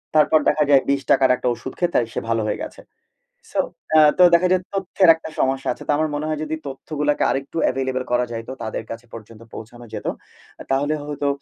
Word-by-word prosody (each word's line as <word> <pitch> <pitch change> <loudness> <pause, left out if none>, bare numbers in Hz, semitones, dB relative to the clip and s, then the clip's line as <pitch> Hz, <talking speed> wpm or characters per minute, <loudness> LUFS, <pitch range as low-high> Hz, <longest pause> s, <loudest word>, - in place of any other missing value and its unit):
তারপর 155 0 +5
দেখা 150 0 +2
যায় 140 -2 +6
৳২০ 140 0 +2
টাকার 135 -1 +5
একটা 125 - -4
ঔষুধ 130 +2 -8
খেয়ে 175 -1 0
তাই 120 - +3
সে - - -1
ভালো 115 -1 +1
হয়ে - - -2
গেছে। - - -9 0.7
সো 290 - +1 0.4
আ - - +8 0.2
তো - - +6
দেখা 175 +2 +4
যায় 185 0 +2
তথ্যের 190 -2 +3
একটা 160 0 -9
সমস্যা 135 0 0
আছে। - - -11
তো - - -1
আমার 155 +1 0
মনে 150 +1 -2
হয় 155 - -2
যদি 155 +1 -3
তথ্যগুলাকে 145 +2 -2
আরেকটু 135 +3 -4
এভেইলেবল 130 0 -2
করা 125 0 +3
যাইত, 115 0 -6
তাদের 110 0 -4
কাছে 115 +1 -7
পর্যন্ত 115 0 -11
পৌঁছানো 120 +2 -10
যেত। - - -6 0.6
তাহলে 145 +3 +1
হয়তো 145 -1 -3
140 Hz, 205 wpm, -21 LUFS, 125-155 Hz, 0.7 s, আ